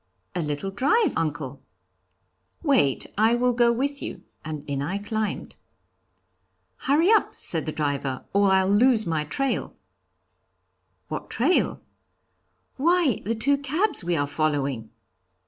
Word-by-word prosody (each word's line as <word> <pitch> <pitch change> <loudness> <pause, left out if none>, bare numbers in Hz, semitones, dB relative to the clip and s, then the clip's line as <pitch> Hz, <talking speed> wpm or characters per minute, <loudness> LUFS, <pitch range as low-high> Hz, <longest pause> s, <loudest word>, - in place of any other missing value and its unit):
'A 180 - -2
little 150 +5 -3
drive, 385 - +2
uncle.' 145 -4 -3 1.0
'Wait, 255 - +2
I 225 +2 +4
will 250 +1 +2
go 240 0 +4
with 280 +4 -2
you,' - - -7 0.2
and 155 -2 -6
in 140 -1 -2
I 175 +8 -2
climbed. 215 0 -4 1.2
'Hurry 315 +9 +2
up,' 440 - +3
said 160 -2 +1
the - - -1
driver, 140 -3 -2
'or 200 0 +4
I'll 190 0 +3
lose 220 +2 +4
the 160 -2 -1
trail.' 275 - -2 1.3
'What - - -5
trail?' 275 +10 +1 1.0
'Why, 330 - +2
the 230 - 0
two 280 +6 +2
cabs 310 - +1
we 175 0 0
are 145 - +1
following.' 140 -6 -1
205 Hz, 130 wpm, -25 LUFS, -, 1.3 s, I